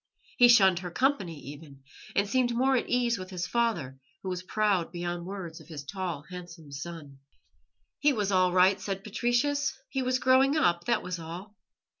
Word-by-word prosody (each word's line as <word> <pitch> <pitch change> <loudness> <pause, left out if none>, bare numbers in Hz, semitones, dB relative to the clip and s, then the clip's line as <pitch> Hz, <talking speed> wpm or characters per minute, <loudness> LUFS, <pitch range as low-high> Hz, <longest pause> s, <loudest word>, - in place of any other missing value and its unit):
He 245 - +8
shunned 190 -7 +6
her 180 -1 -6
company 195 - 0
even, 140 -1 -11 0.3
and 200 +1 +2
seemed 240 +1 +1
more 265 +2 +3
at 245 - -1
ease 240 -3 +1
with 185 0 -7
his 180 -2 -3
father, 180 - -1 0.2
who 190 - -3
was 180 -1 -3
proud 195 -3 0
beyond 175 0 -4
words 185 -5 -7
of - - -16
his 155 -4 -7
tall, 175 -1 -4
handsome 175 -4 -10
son. 145 -1 -8 0.8
He 295 - +4
was 205 -6 -1
all 185 -1 +3
right, 185 +2 +4
said 195 0 -4
Patricius; 260 +7 0
he 270 - -2
was 255 0 +1
growing 260 +3 +4
up, 175 - +2
that 235 - +1
was 180 -1 -4
all. 175 +6 -8
190 Hz, 180 wpm, -28 LUFS, 170-240 Hz, 0.8 s, He